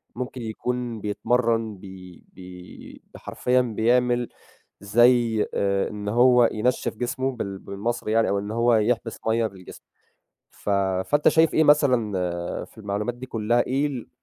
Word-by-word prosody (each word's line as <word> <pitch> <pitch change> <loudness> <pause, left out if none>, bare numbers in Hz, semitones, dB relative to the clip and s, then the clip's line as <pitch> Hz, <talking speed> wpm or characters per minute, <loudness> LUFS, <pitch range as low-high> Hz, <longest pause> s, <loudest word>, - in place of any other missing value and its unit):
ممكن 125 0 -6
يكون 120 0 -4
بيتمرّن 115 0 0
بي 90 -2 -12
بي 90 -1 -12
بحرفيًا 125 0 0
بيعمل 120 +1 +1 0.5
زي 115 +1 +3
آآ 100 -1 0
إن 105 -1 -5
هو 120 +1 +5
ينشِّف 125 +4 -1
جسمه 130 +2 -2
بال 100 -6 -5
بالمصري 110 +3 -4
يعني 115 0 +2
أو 100 - 0
إن 100 +1 -6
هو 115 +1 +2
يحبِس 115 +1 0
مَيّة 110 0 +2
بالجسم، 95 -3 -13 0.7
ف - - -11 0.4
فأنت 145 0 +2
شايف 160 0 +3
إيه 160 - +4
مثلًا 105 - +1
في - - -20
المعلومات 105 +3 -3
دي 125 +1 -9
كلّها، 120 0 0
إيه 135 +3 0
ال 130 -5 -6
115 Hz, 140 wpm, -24 LUFS, 105-125 Hz, 0.7 s, هو